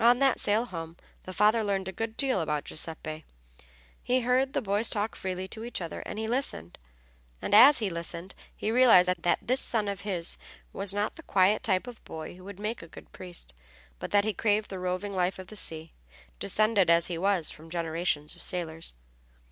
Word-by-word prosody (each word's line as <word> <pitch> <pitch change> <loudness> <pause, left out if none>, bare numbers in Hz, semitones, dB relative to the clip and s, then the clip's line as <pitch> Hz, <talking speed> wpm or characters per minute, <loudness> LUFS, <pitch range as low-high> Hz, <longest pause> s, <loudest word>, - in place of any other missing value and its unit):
On 240 +1 +6
that 270 -1 +3
sail 215 +3 +1
home 165 -6 -7 0.3
the 185 - -6
father 210 +4 +3
learned 195 -2 -1
a - - -3
good 225 +4 -5
deal 260 -9 +1
about 150 -2 -1
Giuseppe. 160 0 -4 0.8
He 255 +1 +1
heard 255 +2 +1
the - - +1
boys 205 +2 +2
talk 210 +1 -2
freely 185 0 -4
to 220 - -7
each 240 - -4
other, 170 -3 -5
and - - -6 1.4
as 270 +7 +9
he 215 -4 0
listened 170 +2 -5 0.2
he 215 - -2
realized 230 -7 +6 0.2
that 175 - +3
this 255 +2 +2
son 215 -3 0
of 200 -1 -3
his 185 -5 +1 0.3
was 195 0 +2
not 205 +7 -1
the - - -9
quiet 200 - +3
type 190 -1 +1
of 245 -2 -10
boy 160 +1 -8
who 185 - -14
would 200 0 -10
make 215 +3 -3
a 165 - -11
good - - -14
priest, 175 - -8 0.5
but - - -5
that 205 0 +3
he 215 - 0
craved 210 +2 0
the 190 - -5
roving 185 +2 -3
life 180 0 0
of 185 -1 -10
the 215 - -10
sea, 160 -4 -2 0.5
descended 205 - +2
as 170 0 +5
he 170 -2 -3
was 190 -3 +2
from 160 +1 -13
generations 165 -2 -2
of - - -15
sailors. 165 - -4
195 Hz, 195 wpm, -28 LUFS, 170-220 Hz, 1.4 s, as